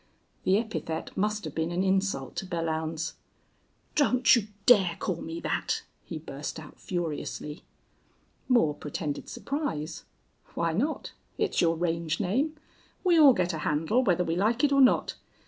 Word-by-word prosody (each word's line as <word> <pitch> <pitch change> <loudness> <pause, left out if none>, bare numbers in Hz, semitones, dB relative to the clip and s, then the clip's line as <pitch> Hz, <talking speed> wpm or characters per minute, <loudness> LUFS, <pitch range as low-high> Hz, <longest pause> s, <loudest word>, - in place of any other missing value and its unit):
The 190 +1 +4
epithet 215 -8 -4
must 210 +2 0
have 155 - -5
been 160 +1 -1
an 175 +2 0
insult 190 -8 0
to 190 - -3
Belllounds. 160 -2 -2 0.8
"Don't 255 -4 +5
you 220 -4 0 0.2
dare 195 -8 +6
call 185 - -2
me 165 +1 -5
that," - - -1 0.2
he 160 - -6
burst 150 0 -6
out, 150 -2 -12
furiously. 165 -2 -4 0.9
Moore 235 - +4
pretended 150 0 -5
surprise. 245 - -3 0.5
"Why 165 -1 0
not? 275 - -1 0.3
It's 430 - +1
your 165 -1 +3
range 165 -1 -1
name. 255 - 0 0.5
We 350 -3 +5
all 285 -4 +9
get 180 -4 0
a 160 - -3
handle, 160 +12 +1
whether 180 -5 +2
we 165 -1 -1
like 220 +8 +1
it 290 - +4
or 275 0 +5
not. 255 - +4
175 Hz, 150 wpm, -28 LUFS, 160-230 Hz, 0.9 s, all